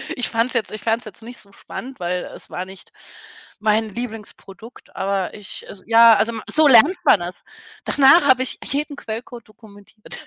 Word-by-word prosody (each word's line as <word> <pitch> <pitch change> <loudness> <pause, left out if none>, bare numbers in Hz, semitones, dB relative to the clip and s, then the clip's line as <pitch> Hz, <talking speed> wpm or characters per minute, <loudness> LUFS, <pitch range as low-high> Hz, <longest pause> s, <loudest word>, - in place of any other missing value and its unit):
Ich 245 - -1
fand's 230 +3 0
jetzt 225 - -1
ich 215 -1 -7
fand's 225 +1 -1
jetzt 215 +1 -11
nicht 235 +2 -9
so 200 - -10
spannend, 260 +4 -9
weil 180 +1 -2
es - - -11
war 180 +1 -5
nicht 190 0 -12 0.7
mein 215 +1 +1
Lieblingsprodukt, 225 -1 -9
aber 195 -1 -2
ich 210 -2 -9
es 190 -2 -12
ja, 230 0 +7
also 230 +2 +1 0.2
so 310 -1 +4
lernt 280 +9 +6
man 195 - +5
es. 175 +1 -6 0.4
Danach 285 +4 +5
habe 260 -2 +4
ich - - 0
jeden 290 +1 -2
Quellcode 230 +1 -8
dokumentiert. 215 -1 -12
225 Hz, 175 wpm, -20 LUFS, 200-245 Hz, 0.7 s, ja